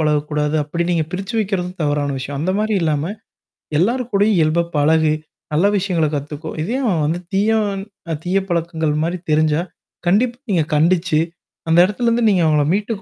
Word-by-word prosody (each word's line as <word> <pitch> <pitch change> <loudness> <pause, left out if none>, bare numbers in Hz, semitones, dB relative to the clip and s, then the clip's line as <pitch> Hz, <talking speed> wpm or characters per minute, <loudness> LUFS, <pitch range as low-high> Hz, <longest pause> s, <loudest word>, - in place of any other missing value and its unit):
பழகக்கூடாது 150 0 0
அப்பிடி 170 +4 -2
நீங்க 160 -2 +1
பிரிச்சு 195 +5 -4
வைக்கிறதும் 190 -3 -2
தவறான 145 -1 0
விஷயம். 135 +2 -5
அந்த 185 +4 0
மாதிரி 215 0 0
இல்லாம 155 +3 0 0.7
எல்லார் 240 +7 +2
கூடயும் 205 +1 +3
இயல்பா 160 +2 +2
பழகு! 155 +1 +3 0.4
நல்ல 165 +6 +3
விஷயங்கள 180 -5 +1
கத்துக்கோ! 150 +2 -5
இதேயே 240 +10 -2
அவன் 175 - +1
வந்து 165 +4 -1
தீயா 210 +3 +3 0.5
அ - - +1
தீய 185 +2 +1
பழக்கங்கள்மாரி 165 0 -1
தெரிஞ்சா 155 +1 +3 0.5
கண்டிப்பா 235 +7 +2
நீங்க 170 -4 +3
கண்டிச்சு 165 +1 +2 0.5
அந்த 165 - +4
இடத்துலருந்து 235 +3 +1
நீங்க 185 -3 +3
அவுங்கள 150 -1 +3
மீட்டுக் 205 0 -2
170 Hz, 150 wpm, -19 LUFS, 155-195 Hz, 0.7 s, அந்த